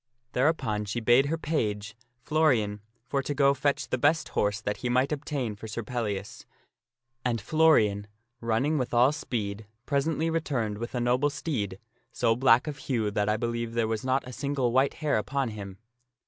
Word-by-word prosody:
Thereupon 125 Hz, -7 st, +1 dB
she 105 Hz, +4 st, -2 dB
bade 120 Hz, +4 st, +4 dB
her 165 Hz, +3 st, -1 dB
page, 110 Hz, -10 st, -2 dB, 0.3 s
Florian, 120 Hz, -10 st, +2 dB, 0.2 s
for 140 Hz, +2 st, -1 dB
to 145 Hz, +2 st, -3 dB
go 140 Hz, 0 st, +4 dB
fetch 140 Hz, 0 st, 0 dB
the 130 Hz, -, -1 dB
best 150 Hz, +2 st, +2 dB
horse 105 Hz, 0 st, 0 dB
that 105 Hz, -1 st, -3 dB
he 125 Hz, -, -3 dB
might 130 Hz, +3 st, +2 dB
obtain 140 Hz, -6 st, -3 dB
for 110 Hz, +2 st, -9 dB
Sir 110 Hz, +2 st, -4 dB
Pellias; 105 Hz, -4 st, -4 dB, 0.8 s
and 120 Hz, -2 st, 0 dB
Florian, 110 Hz, -6 st, +3 dB, 0.3 s
running 120 Hz, +7 st, +1 dB
with 125 Hz, -1 st, -2 dB
all 125 Hz, +3 st, +6 dB
speed, 110 Hz, -8 st, -4 dB, 0.2 s
presently 155 Hz, +3 st, 0 dB
returned 125 Hz, -10 st, -1 dB
with 120 Hz, +3 st, -5 dB
a -, -, 0 dB
noble 125 Hz, +4 st, +2 dB
steed, 110 Hz, -, -3 dB, 0.3 s
so 115 Hz, -, +2 dB
black 125 Hz, 0 st, +5 dB
of 150 Hz, -2 st, -5 dB
hue 115 Hz, -7 st, -1 dB
that 105 Hz, +1 st, 0 dB
I 105 Hz, -, +2 dB
believe 115 Hz, 0 st, -3 dB
there 115 Hz, -1 st, +1 dB
was 110 Hz, -1 st, -2 dB
not 130 Hz, 0 st, 0 dB
a 125 Hz, -, -8 dB
single 140 Hz, -2 st, -1 dB
white 130 Hz, +3 st, +2 dB
hair 150 Hz, -7 st, +1 dB
upon 135 Hz, +3 st, -1 dB
him. 100 Hz, -3 st, -8 dB
120 Hz, 175 wpm, -28 LUFS, 110-140 Hz, 0.8 s, all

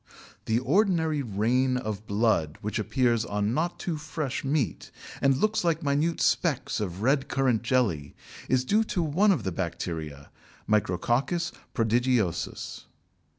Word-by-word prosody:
The 110 Hz, -, +1 dB
ordinary 160 Hz, -, +2 dB
"Rain 125 Hz, +3 st, +1 dB
of 110 Hz, -3 st, -5 dB
Blood" 100 Hz, -8 st, +1 dB
which 105 Hz, +2 st, -2 dB
appears 120 Hz, 0 st, +1 dB
on 105 Hz, 0 st, -1 dB
not 170 Hz, +5 st, -1 dB
too 170 Hz, -4 st, -2 dB
fresh 150 Hz, -3 st, -4 dB
meat, 135 Hz, -, -1 dB, 0.3 s
and 135 Hz, -1 st, +3 dB
looks 215 Hz, +6 st, +1 dB
like 165 Hz, -1 st, +1 dB
minute 145 Hz, +4 st, +1 dB
specks 150 Hz, -10 st, +1 dB
of 95 Hz, -1 st, -4 dB
red 135 Hz, +2 st, +2 dB
currant 130 Hz, -5 st, +1 dB
jelly, 110 Hz, -, 0 dB, 0.3 s
is 130 Hz, 0 st, +2 dB
due 215 Hz, +9 st, +3 dB
to 180 Hz, -5 st, -1 dB
one 180 Hz, +7 st, +3 dB
of 190 Hz, -, 0 dB
the 95 Hz, -, -2 dB
Bacteria 80 Hz, -5 st, -5 dB, 0.4 s
(Micrococcus 120 Hz, -, +1 dB, 0.2 s
prodigiosus). 115 Hz, -4 st, 0 dB
125 Hz, 135 wpm, -27 LUFS, 105-155 Hz, 0.4 s, and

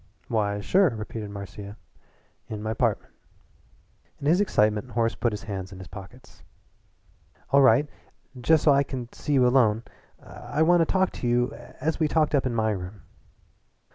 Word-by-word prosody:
"Why, 105 Hz, -2 st, 0 dB
sure," 185 Hz, -, +3 dB
repeated 110 Hz, -2 st, -6 dB
Marcia, 100 Hz, +1 st, -8 dB, 0.7 s
"in 105 Hz, -1 st, -6 dB
my 110 Hz, 0 st, -2 dB
'partment." 110 Hz, -, -1 dB, 1.1 s
In -, -, -7 dB
his 170 Hz, +6 st, +4 dB
excitement 105 Hz, -, +1 dB
Horace 115 Hz, 0 st, 0 dB
put 120 Hz, -, -1 dB
his 105 Hz, -1 st, -6 dB
hands 95 Hz, -3 st, -6 dB
in 95 Hz, -, -10 dB
his 95 Hz, -1 st, -10 dB
pockets. 100 Hz, +6 st, -13 dB, 1.1 s
"All 140 Hz, +1 st, +6 dB
right 140 Hz, +2 st, +5 dB, 0.5 s
just 150 Hz, +5 st, +2 dB
so 150 Hz, -, +6 dB
I 140 Hz, -, +4 dB
can 130 Hz, -3 st, -5 dB
see 150 Hz, -, -3 dB
you 130 Hz, -2 st, +4 dB
alone. 115 Hz, -3 st, +3 dB, 0.4 s
I 155 Hz, -, -3 dB
want 175 Hz, +2 st, +4 dB
to 165 Hz, -, +3 dB
talk 190 Hz, -1 st, +2 dB
to 125 Hz, -, -5 dB
you 120 Hz, +1 st, +1 dB, 0.3 s
as 160 Hz, +5 st, -1 dB
we 155 Hz, -, +2 dB
talked 155 Hz, 0 st, +1 dB
up 135 Hz, -2 st, +2 dB
in 120 Hz, -, -3 dB
my 110 Hz, -1 st, +1 dB
room." 95 Hz, -1 st, -6 dB
120 Hz, 170 wpm, -26 LUFS, 105-145 Hz, 1.1 s, All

